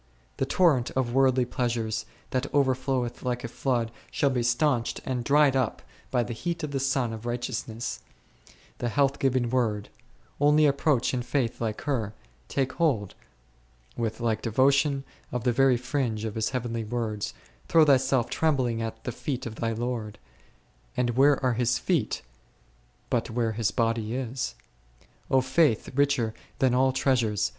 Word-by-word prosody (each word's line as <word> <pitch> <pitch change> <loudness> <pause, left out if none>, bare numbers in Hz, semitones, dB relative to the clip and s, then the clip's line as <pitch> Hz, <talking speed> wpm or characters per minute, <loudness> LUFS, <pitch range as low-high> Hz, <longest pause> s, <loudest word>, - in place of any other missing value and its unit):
The 135 - 0
torrent 145 -7 +3
of 125 -2 0
worldly 130 -1 +4
pleasures, 115 -3 -2 0.2
that 130 +2 -1
overnoweth 130 -3 +1
like 125 -1 -2
a - - -2
flood, 120 -1 -1 0.2
shall 140 - +1
be 125 -2 0
staunched 120 0 +1
and 125 -2 -2
dried 145 0 +4
up 130 -5 0 0.3
by 120 - +1
the 120 - -5
heat 170 +7 -3
of 150 - -3
the 135 - -1
Sun 130 -3 0
of 110 +1 -7
Righteousness, 120 -1 -3 0.8
the 120 - -1
health 140 +2 +1
giving 130 -3 +1
Word; 110 -5 0 0.5
only 150 +1 +5
approach 140 -3 +2
in 125 - 0
faith 120 -1 -1
like 110 -2 -2
her; 115 -8 -2 0.3
take 130 -2 -1
hold, 120 - +1 0.8
with 115 -1 -2
like 115 -2 0
devotion, 135 +4 +2 0.3
of 125 -3 -2
the 125 - +3
very 130 0 +4
fringe 125 -4 -2
of 110 - -3
His 110 0 -1
heavenly 120 -3 -3
words; 110 -2 -3 0.3
throw 165 -2 +6
thyself 130 -3 +3
trembling 130 -8 +1
at 115 0 -5
the 125 - -3
feet 130 0 -4
of 115 - -5
thy 115 -1 -1
Lord; 115 -2 -3 0.8
and 125 -1 +2
where 135 +3 +4
are 125 - +3
His 120 +1 +1
feet, - - 0 0.9
but - - 0
where 115 -1 0
His 110 -1 0
Body 115 -1 0
is? 130 -1 -3 0.7
O 130 - +4
faith 130 -2 +2
richer 140 -6 +2 0.2
than 130 -2 +3
all 130 +1 +4
treasures 115 -6 +1
125 Hz, 155 wpm, -27 LUFS, 115-135 Hz, 0.9 s, throw